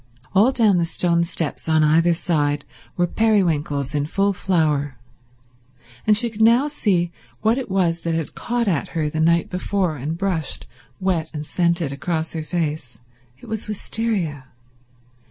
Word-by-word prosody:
All 215 +7 +5
down 220 -7 +3
the 170 - +2
stone 170 0 +1
steps 165 -2 -3
on 155 -1 +4
either 165 +3 +4
side 150 -5 0 0.3
were 175 - +3
periwinkles 165 - +1
in 145 0 0
full 200 +4 +1
flower, 150 -8 0 1.1
and 210 -1 +6
she 235 +1 +1
could 220 0 -5
now 235 +6 +5
see 185 - 0 0.3
what 225 +4 +2
it 260 - -6
was 175 -3 +1
that 165 -1 -1
had 165 -2 -3
caught 240 -1 -2
at 165 -7 0
her 150 -2 0
the 155 - -1
night 170 +1 +2
before 180 -3 -1
and 150 +5 -4
brushed, 175 -6 -2 0.3
wet 180 -4 0
and 150 0 -4
scented, 170 -2 0
across 160 +3 -3
her 160 - -3
face. 155 -5 -3 0.4
It - - -15
was 220 -1 -3
wistaria. 205 - -2
170 Hz, 155 wpm, -22 LUFS, 155-200 Hz, 1.1 s, and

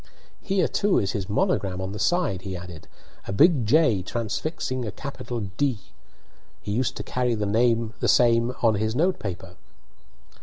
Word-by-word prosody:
"Here, 190 -3 +1
too, 205 -1 +1
is 100 -1 +1
his 100 -4 -4
monogram 100 - 0
on 95 0 -4
the 105 - -6
side," 105 - +1
he 95 -1 -5
added 85 -2 -10 0.2
" - - -25
a - - -3
big 145 - +4
J 120 - +4
transfixing 125 - -3
a 110 - -4
capital 125 -1 -6 0.2
D. 140 -5 +1 0.8
He 100 - -6
used 120 +5 -1
to - - -4
carry 125 -2 -1
the 115 +2 +1 0.2
same 120 0 +4
on 115 -2 +5
his 110 +2 -1
note 180 +7 +1
paper." 90 -2 -6
115 Hz, 160 wpm, -25 LUFS, 100-130 Hz, 0.8 s, on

